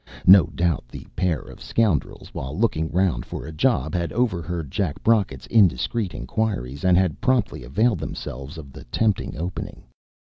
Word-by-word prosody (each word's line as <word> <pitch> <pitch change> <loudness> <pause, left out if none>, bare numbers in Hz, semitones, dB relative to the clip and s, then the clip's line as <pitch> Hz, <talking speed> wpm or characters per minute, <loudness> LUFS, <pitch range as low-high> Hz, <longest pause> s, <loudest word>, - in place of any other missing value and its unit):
No 95 -3 +9
doubt 85 -8 -1
the - - -10
pair 90 -3 0
of - - -13
scoundrels, 105 -9 -1
while 65 +5 -5
looking 80 -8 +1
round 90 -9 +1
for - - -7
a 80 - -7
job, 115 +11 +1
had 85 -2 -1
overheard 85 - -1
Jack 90 -5 -2
Brocket's 105 - +2
indiscreet 95 - +2
inquiries, 70 - -2
and 90 -1 +5
had 90 -4 +1
promptly 130 - +1
availed 100 - +1
themselves 70 +4 -6
of 70 -4 -10
the - - -10
tempting 105 - 0
opening. 85 +4 -5
90 Hz, 160 wpm, -23 LUFS, 75-105 Hz, -, No